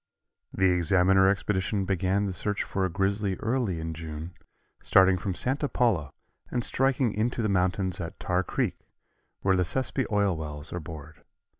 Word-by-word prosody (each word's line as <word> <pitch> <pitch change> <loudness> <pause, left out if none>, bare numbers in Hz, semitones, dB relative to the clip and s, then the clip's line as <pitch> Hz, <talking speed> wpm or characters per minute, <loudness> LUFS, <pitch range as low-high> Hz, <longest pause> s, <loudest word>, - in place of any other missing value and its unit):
The 95 0 +3
Examiner 95 +2 +4
expedition 100 0 0
began 95 +1 +1
the 95 - -2
search 105 +4 -1
for 95 -1 -1
a - - -1
grizzly 100 +2 0
early 115 -7 -1
in 80 0 -4
June, 80 +1 -7 0.5
starting 95 0 +5
from 95 +1 -3
Santa 140 +6 0
Paula 95 -13 +1 0.4
and 120 -1 -1
striking 135 -3 +1
into 115 +2 -1
the 110 - +1
mountains 95 -1 0
at 85 0 -7
Tar 90 0 0
Creek, - - -2 0.6
where 95 -1 +3
the 90 - +2
Sespe 130 +5 -2
oil 100 -3 +2
wells 75 -1 -6
are 90 - -2
bored. 80 -1 -10
95 Hz, 160 wpm, -27 LUFS, 85-105 Hz, 0.6 s, starting